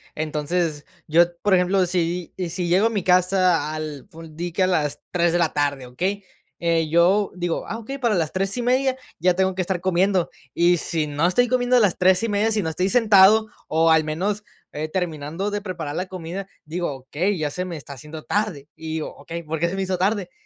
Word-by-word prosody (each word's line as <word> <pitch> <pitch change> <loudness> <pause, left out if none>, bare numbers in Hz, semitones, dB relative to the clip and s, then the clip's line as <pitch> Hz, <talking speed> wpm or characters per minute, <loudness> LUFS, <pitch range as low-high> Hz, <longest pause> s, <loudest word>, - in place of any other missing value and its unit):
Entonces, 155 0 -2 0.2
yo, 170 +3 +5 0.2
por 205 - +3
ejemplo, 185 +1 +3
si 175 -1 -2 0.2
si 175 +1 -3
llego 185 +6 +4
a - - 0
mi 205 -5 -2
casa 180 -3 +2
al 155 -1 -6
ful 165 -3 -12
di 175 +2 -4
que 185 +3 +1
a - - +3
las 155 -6 0
3 175 -1 +2
de 175 - +2
la 170 -3 +1
tarde, 140 -3 -1
¿okey? 185 +11 -3 0.3
Eh, 165 -2 +1
yo 180 +5 +3
digo: 175 -2 -2
"Ah, 225 - -4
okey, 270 +5 -7
para 235 -5 +1
las 160 -4 0
3 195 +3 -1
y 245 - -1
media 260 +2 +2 0.2
ya 180 +2 +3
tengo 190 0 +1
que 185 - -2
estar 180 -1 -2
comiendo. 185 0 +1 0.2
Y 175 +1 +4
si 160 -1 -1
no 150 +3 0
estoy 245 +7 +3
comiendo 250 0 +2
a - - +6
las 205 -6 +3
3 185 +2 +4
y - - +1
media, 210 +2 +1
si 210 -2 0
no 160 - -1
estoy 180 +4 -1
sentado, 220 -1 +5 0.2
o, 165 +1 +3
al 160 0 +5
menos, 190 +7 -2 0.3
eh, 155 +1 -4
terminando 165 +2 -3
de 205 0 -2
preparar 170 -7 -5
la 185 - -2
comida, 185 +1 -6 0.2
digo: 170 +1 -3
"Okey, 160 +9 -2
ya 150 -2 -2
se 180 +4 -3
me 175 -3 -5
está 140 -1 -9
haciendo 150 +4 -10
tarde". 200 -10 -2
Y 160 0 -6
digo: 160 - -4
"Okey, 170 +1 -7
¿por 160 0 -4
qué 170 +2 +1
se 185 - -4
me 195 - -1
hizo 185 -1 -2
tarde?". 195 -1 0
180 Hz, 225 wpm, -23 LUFS, 160-195 Hz, 0.3 s, a